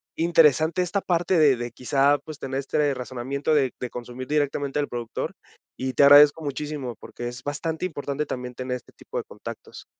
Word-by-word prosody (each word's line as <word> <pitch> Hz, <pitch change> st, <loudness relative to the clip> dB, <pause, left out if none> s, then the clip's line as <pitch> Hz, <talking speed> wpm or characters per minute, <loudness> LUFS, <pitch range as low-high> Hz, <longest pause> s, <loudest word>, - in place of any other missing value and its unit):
interesante 165 Hz, +1 st, +4 dB
esta 195 Hz, +3 st, -1 dB
parte 175 Hz, 0 st, +1 dB
de 145 Hz, -4 st, +6 dB
de 120 Hz, -1 st, -5 dB
quizá, 140 Hz, +3 st, +2 dB
pues, 155 Hz, -2 st, -9 dB
tener 135 Hz, -1 st, -3 dB
este 145 Hz, +1 st, 0 dB
razonamiento 130 Hz, +4 st, -2 dB
de 135 Hz, -4 st, +2 dB
de 125 Hz, -, -4 dB
consumir 125 Hz, +2 st, -7 dB
directamente 145 Hz, -1 st, 0 dB
del 145 Hz, -1 st, 0 dB
productor, 120 Hz, -1 st, -4 dB, 0.4 s
y 130 Hz, 0 st, -3 dB
te 140 Hz, -, +4 dB
agradezco 145 Hz, +2 st, +8 dB
muchísimo, 145 Hz, -4 st, -4 dB
porque 120 Hz, -, -7 dB
es 120 Hz, +1 st, -7 dB
bastante 155 Hz, +4 st, -3 dB
importante 145 Hz, -2 st, -4 dB
también 125 Hz, 0 st, -5 dB
tener 125 Hz, 0 st, -3 dB
este 125 Hz, -, -11 dB
tipo -, -, -8 dB
de -, -, -1 dB
contactos. -, -, -10 dB
140 Hz, 180 wpm, -25 LUFS, 125-150 Hz, 0.4 s, agradezco